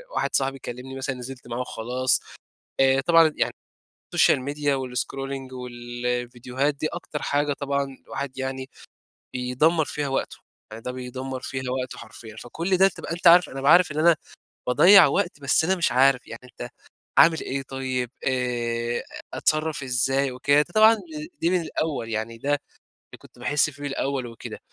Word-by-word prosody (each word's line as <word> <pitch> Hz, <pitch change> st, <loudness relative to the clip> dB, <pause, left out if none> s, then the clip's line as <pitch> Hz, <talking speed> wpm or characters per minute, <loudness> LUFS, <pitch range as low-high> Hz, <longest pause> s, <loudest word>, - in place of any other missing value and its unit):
واحد -, -, 0 dB
صاحبي 135 Hz, 0 st, +1 dB
يكلِّمني 130 Hz, 0 st, -8 dB
مثلًا 135 Hz, 0 st, -3 dB
نزلت 125 Hz, 0 st, -9 dB
معاه 120 Hz, +1 st, -4 dB
و -, -, -1 dB
خلاص، 125 Hz, +2 st, 0 dB, 0.6 s
آآ، 135 Hz, 0 st, +4 dB
طبعًا 165 Hz, 0 st, +5 dB
يعني -, -, 0 dB, 0.6 s
الSocial -, -, +5 dB
Media 145 Hz, -1 st, 0 dB
والScrolling 130 Hz, +1 st, -4 dB
والفيديوهات، 125 Hz, +2 st, -3 dB
دي 155 Hz, +2 st, -2 dB
أكتر 165 Hz, -3 st, -6 dB
حاجة 145 Hz, 0 st, 0 dB
طبعًا 140 Hz, -1 st, -3 dB
الواحد 135 Hz, -1 st, -6 dB
يعني 130 Hz, 0 st, -4 dB, 0.6 s
بيدمَّر 130 Hz, +6 st, +1 dB
فيها 145 Hz, -1 st, -3 dB
وقتُه، 135 Hz, -, -2 dB, 0.4 s
يعني 115 Hz, +1 st, -9 dB
ده 125 Hz, -, -4 dB
بيدمَّر 130 Hz, +1 st, -6 dB
فيها 130 Hz, -1 st, -4 dB
وقته 130 Hz, -1 st, -4 dB
حرفيًا. 110 Hz, -1 st, -11 dB
فكل 170 Hz, -, -2 dB
ده 190 Hz, +1 st, +6 dB
تبقى 175 Hz, -, -7 dB
أنت 175 Hz, +1 st, -5 dB
عارف 175 Hz, +1 st, +8 dB
أنا -, -, -11 dB
بابقى 135 Hz, +3 st, +4 dB
عارف 175 Hz, -3 st, +5 dB
إن 150 Hz, -, -5 dB
أنا 170 Hz, +1 st, +5 dB, 0.5 s
باضيّع 175 Hz, +9 st, +8 dB
وقت، 145 Hz, +1 st, -1 dB
بس 140 Hz, +3 st, +2 dB
أنا 190 Hz, +3 st, +2 dB
مش 170 Hz, -, +1 dB
عارف 130 Hz, 0 st, +4 dB
يعني 115 Hz, -, -9 dB
أنت 125 Hz, -, -9 dB, 0.5 s
أعمل 165 Hz, -1 st, +6 dB
إيه 135 Hz, +1 st, -3 dB
طيب، 130 Hz, -2 st, -3 dB, 0.2 s
آآ، 120 Hz, -2 st, -1 dB
أ -, -, -7 dB, 0.3 s
أتصرَّف 155 Hz, -1 st, 0 dB
إزاي 135 Hz, +1 st, +1 dB
وكده، 140 Hz, +3 st, +3 dB
ده -, -, -2 dB
طبعًا 220 Hz, +1 st, +7 dB, 0.4 s
دي 165 Hz, -, +2 dB
من 180 Hz, -1 st, +2 dB
الأول 145 Hz, -8 st, -3 dB
يعني 110 Hz, +1 st, -3 dB
ده 140 Hz, -, -4 dB, 0.4 s
اللي -, -, -17 dB
كنت -, -, -19 dB
باحس 145 Hz, +4 st, +2 dB
فيه 145 Hz, 0 st, -12 dB
الأول 135 Hz, -2 st, -2 dB
وكده، 115 Hz, -1 st, -9 dB
135 Hz, 165 wpm, -24 LUFS, 125-145 Hz, 0.6 s, عارف